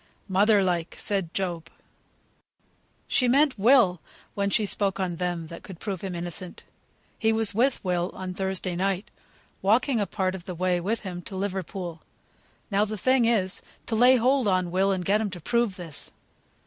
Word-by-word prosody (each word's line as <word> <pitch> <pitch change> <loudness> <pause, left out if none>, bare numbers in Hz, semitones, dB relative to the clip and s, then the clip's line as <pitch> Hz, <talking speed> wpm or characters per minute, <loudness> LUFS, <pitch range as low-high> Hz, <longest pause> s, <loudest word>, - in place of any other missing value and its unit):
"Mother 200 +1 +4
like!" 175 -3 -1
said 195 -5 -1
Job. 175 -4 -3 1.4
"She 250 - +2
meant 270 -1 +3
Will, 205 - +5 0.3
when 200 0 0
she 210 +1 +2
spoke 195 -1 0
of 180 -3 -2
them 175 -2 -2
that 170 +1 -9
could 185 -3 -11
prove 195 -4 -4
him 190 -2 -4
innocent. 175 +1 -4 0.6
He 220 - +3
was 220 -2 +2
with 250 +6 +1
Will 180 0 0
on 185 -1 -5
Thursday 190 -1 -2
night, 195 +2 -1 0.5
walking 230 +5 +3
a 200 - 0
part 185 0 -1
of 185 -2 -8
the 180 -3 -5
way 180 +1 +1
with 210 +6 -1
him 180 -3 -6
to 190 - -8
Liverpool; 185 -3 -4 0.7
now 200 +1 +3
the 215 0 -3
thing 255 +3 +3
is 200 -5 +1 0.2
to 225 - -2
lay 250 +3 +6
hold 255 0 +2
on 185 -2 +1
Will 190 +2 +2
and 185 -2 -2
get 205 +4 +3
him 215 - -1
to 180 -2 -7
prove 235 +3 0
this." 170 -6 -7
195 Hz, 175 wpm, -26 LUFS, 180-220 Hz, 1.4 s, lay